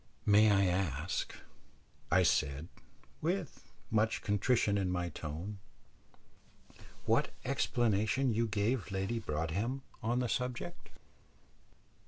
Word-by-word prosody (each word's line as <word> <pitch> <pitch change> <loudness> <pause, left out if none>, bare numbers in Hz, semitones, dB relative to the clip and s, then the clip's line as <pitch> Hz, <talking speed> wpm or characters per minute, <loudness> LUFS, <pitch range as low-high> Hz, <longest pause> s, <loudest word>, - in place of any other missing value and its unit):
"May 105 +1 +6
I 100 -1 +4
ask," 90 -3 -1 0.7
I - - +5
said, 70 +5 +1 0.5
with 175 0 -3 0.2
much 110 0 +1
contrition 105 +1 +2
in 95 -2 0
my 90 -1 -1
tone, 85 +7 -6 1.5
"what - - +3 0.2
explanation 115 +2 +1
you 115 +2 +1
gave 105 +3 0
Lady 95 +4 -1
Broadhem 100 - -2 0.2
on 120 +1 0
the 125 -1 +1
subject?" 125 +9 -3
105 Hz, 100 wpm, -33 LUFS, 95-120 Hz, 1.5 s, May